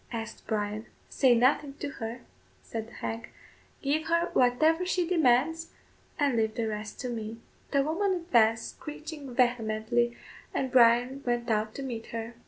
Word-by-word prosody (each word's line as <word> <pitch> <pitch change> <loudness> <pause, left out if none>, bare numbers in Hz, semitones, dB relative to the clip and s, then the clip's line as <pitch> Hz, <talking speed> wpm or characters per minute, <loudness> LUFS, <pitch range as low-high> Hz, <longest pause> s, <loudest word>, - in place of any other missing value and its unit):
asked 225 -2 -6
Bryan. 210 0 -2 0.2
"Say 255 -3 +4
nothing 275 +4 +2
to 290 - -4
her," 230 +2 -4 0.4
said 225 -1 -5
the 235 - -16
hag; 225 +1 -5 0.5
"give 305 +3 0
her 335 +1 +1
whatever 310 +8 +3
she 360 -1 0
demands, 325 0 +2 0.4
and 280 -5 +2
leave 220 -1 +1
the 230 -1 -1
rest 210 -1 -5
to 250 - -3
me." 225 -1 -5 0.3
The 280 -1 +2
woman 375 +7 +1
advanced 235 -10 +2
screeching 300 -3 -8
vehemently, 235 0 +1 0.4
and 260 -1 -1
Bryan 245 +2 +5
went 240 -1 -1
out 215 0 0
to 275 - -5
meet 235 -4 -5
her. 230 0 -5
245 Hz, 155 wpm, -29 LUFS, 225-290 Hz, 0.5 s, Bryan